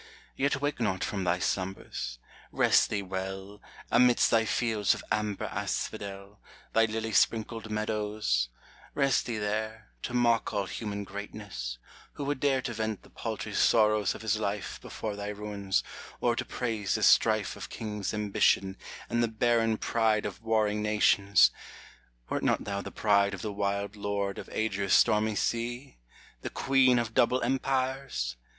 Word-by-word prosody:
Yet 140 0 +1
wake 145 -1 -1
not 95 -5 0
from 100 -2 -2
thy 85 0 +2
slumbers, 90 -9 -3 0.2
— - - -21
rest - - +4
thee 100 -2 -1
well, 95 +2 -5 0.3
Amidst 125 -1 +5
thy 115 -1 +4
fields 110 -4 +1
of - - -9
amber 105 -2 -1
asphodel, 100 0 -4 0.3
Thy 115 0 +5
lily 110 0 -3
sprinkled 110 +1 +1
meadows, 105 - 0 0.2
— - - -24
rest 140 -3 +2
thee 115 -2 -2
there, 110 +1 -3
To 125 - -4
mock 120 -3 +2
all 100 -1 0
human 100 +2 -4
greatness: 100 - -6 0.4
who 145 - -5
would 145 -1 -1
dare 135 -2 +2
To 120 - -3
vent 110 -2 -3
the - - -18
paltry - - -5
sorrows 105 -3 +3
of - - -9
his 110 0 +1
life 100 -1 -3
Before 105 -2 -5
thy 100 0 -5
ruins, 105 -2 -2 0.4
or 120 -1 +2
to - - -2
praise 110 -5 -2
the - - -1
strife - - +4
Of - - -8
kings' 105 -3 -4
ambition, 100 -2 +1 0.3
and 120 +1 0
the 120 - +3
barren 115 0 +2
pride 110 -2 +1
Of 100 0 -5
warring 110 -2 +1
nations! 105 -2 +4 0.8
wert - - -2
not - - +1
thou 100 -1 -3
the - - -7
Bride 100 -2 +2
Of 95 - -9
the 105 -2 -3
wild 100 0 -2
Lord 100 -1 -2
of - - -9
Adria's 100 -3 -1
stormy 110 -1 +3
sea! 120 - -2 0.4
The - - -4
Queen 130 -2 +3
of 115 -2 -1
double 125 +3 +3
Empires 130 - -1
105 Hz, 160 wpm, -29 LUFS, 100-115 Hz, 0.8 s, Amidst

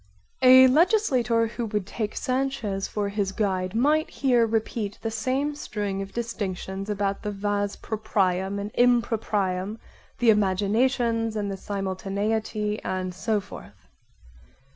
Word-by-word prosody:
A 260 0 +9
legislator 260 - +3
who 230 0 -4
should 210 -3 -1
take 210 +1 -4
Sanchez 255 -7 -1
for 205 -1 -2
his 200 -1 -1
guide 190 -2 -1
might 300 +6 +2
here 245 -4 +2
repeat 220 -2 -2
the 225 - -2
same 260 +6 -1
string 205 -9 -4
of 195 0 -7
distinctions 195 -4 -4
about 200 -1 -1
the 210 - -3
vas 205 0 -1
proprium 195 -3 -1
and 200 +1 -4
improprium, 215 -5 +1 0.4
the 240 -2 +5
imaginations 225 +3 +1
and 205 -2 -2
the - - -3
simultaneity 205 +2 -2
and 185 -1 -3
so 210 +3 0
forth. 200 0 -12
210 Hz, 125 wpm, -25 LUFS, 195-235 Hz, 0.4 s, A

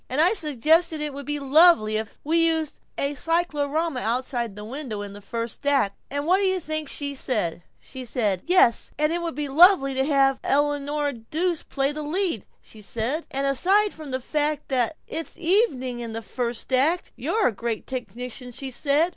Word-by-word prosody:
"And 260 - -1
I 350 +6 +6
suggested 315 - +2
it 300 -1 -2
would 280 0 -8
be 295 0 -1
lovely 275 -6 +5
if 220 -1 -5
we 320 +3 +1
used 320 -2 -1 0.2
a 280 +1 -1
cyclorama 315 -1 -1
outside 240 -1 -2
the 210 0 -8
window 235 -4 -5
in 200 -1 -8
the 205 - -11
first 230 +2 -5
act, 265 -9 +2
and 285 +1 -3
what 365 +4 +3
do 395 - +2
you 375 0 +1
think 310 -3 -4
she 285 -1 -2
said? 210 -11 -2 0.9
'Yes, 355 -10 +4
and 305 +2 +1
it 345 - -1
would 335 -5 -4
be 295 0 -3
lovely 285 -1 +6
to 265 0 +1
have 270 -2 +3
Eleanora 290 +1 0
Duse 315 +9 -2
play 275 0 -1
the 305 +1 -3
lead,' 325 - -1 0.2
she 215 - -11
said, 235 +10 -2
'and 275 +1 -2
aside 385 +10 +3
from 310 -2 -9
the 260 0 -2
fact 300 +2 -2
that 260 +2 +1
it's 325 +1 -6
evening 310 - +1
in 230 -2 -6
the 225 0 -5
first 240 +4 -4
act, 310 +8 +2
you're 445 - +1
a - - -3
great 225 +1 -4
technician,' 250 0 -6
she 265 +2 -5
said. 290 +6 +2
280 Hz, 185 wpm, -24 LUFS, 245-315 Hz, 0.9 s, I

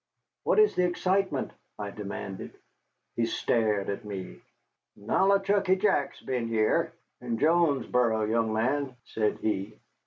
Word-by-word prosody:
"What - - +2
is 430 0 +6
the 180 - +1
excitement?" 185 -4 0 0.3
I 100 -1 -5
demanded. 100 -1 -6 0.6
He 115 -1 +1
stared 110 -4 +1
at 100 +3 -3
me. 95 - -7 0.6
"Nollichucky 195 - +2
Jack's 190 -8 +1
been 125 -3 -2
heah, 110 -1 +1 0.3
in 120 -2 -2
Jonesboro, 130 -7 +2
young 110 +1 +1
man," 130 +4 0
said 105 -1 -1
he. 105 0 -2
115 Hz, 120 wpm, -28 LUFS, 105-170 Hz, 0.6 s, is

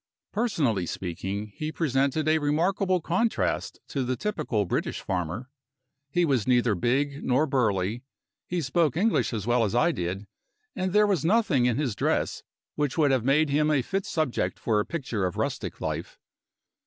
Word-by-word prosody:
Personally 155 - 0
speaking, 95 +5 -4
he 155 0 -3
presented 140 0 0
a 160 0 +4
remarkable 180 +5 +1
contrast 190 +8 0
to 135 - -1
the 130 +1 -1
typical 145 - -1
British - - -2
farmer. 95 +8 -3 0.6
He 175 +4 +2
was 130 -9 +1
neither 125 -3 +3
big 140 - 0
nor 130 +4 +2
burly; 110 -5 0 0.5
he 180 -1 -1
spoke 155 +1 +1
English 220 +5 +2
as 110 -4 -3
well 120 0 +3
as 110 +1 -1
I 165 +8 +4
did; 95 - -3 0.5
and 185 0 -1
there 210 +2 +5
was 195 -8 +1
nothing 170 - +3
in 125 - +1
his 135 -8 -1
dress - - 0 0.3
which 145 -1 -1
would 150 -3 +4
have 130 -4 +2
made 140 +3 +3
him 150 +2 +3
a 145 -4 +2
fit 195 +7 -2
subject 155 -6 -1
for 110 -3 +1
a 105 - -1
picture 130 - -3
of 90 -2 -2
rustic - - -3
life. - - -4
140 Hz, 165 wpm, -27 LUFS, 115-165 Hz, 0.6 s, there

